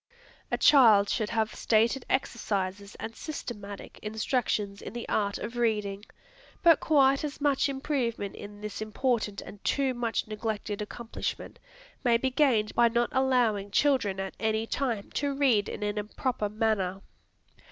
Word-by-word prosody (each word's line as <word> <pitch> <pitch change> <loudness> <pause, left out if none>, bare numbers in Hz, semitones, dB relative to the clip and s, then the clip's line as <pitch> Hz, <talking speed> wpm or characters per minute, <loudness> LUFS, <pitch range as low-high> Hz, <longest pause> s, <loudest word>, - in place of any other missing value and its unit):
A - - 0
child 220 -8 +6
should 215 -3 0
have 220 -1 0
stated 230 +4 +1
exercises 200 -5 -2
and 225 - -7
systematic 205 -9 -7
instructions 215 -2 -1
in - - -8
the 240 -1 -6
art 200 -1 0
of 230 +3 -6
reading. 210 -3 0 0.6
But 335 -3 +7
quite 275 -2 +4
as 295 -1 -4
much 285 -1 +2
improvement 265 -7 -2
in 205 0 -10
this 210 0 -6
important 215 -1 -1
and 205 - -12
too 275 -2 +1
much 235 -3 -2
neglected 215 -1 -3
accomplishment 225 +2 -5 0.4
may 240 -2 +4
be 260 +2 -1
gained 250 -6 +2
by 240 0 +5
not 235 +1 +1
allowing 245 -7 +2
children 210 -4 +2
at 195 0 -4
any 220 0 0
time 230 -4 -2
to 285 -1 -1
read 245 -8 +3
in 210 - -5
an 210 0 -1
improper 210 +1 -2
manner. 205 -3 0
225 Hz, 145 wpm, -28 LUFS, 205-260 Hz, 0.6 s, But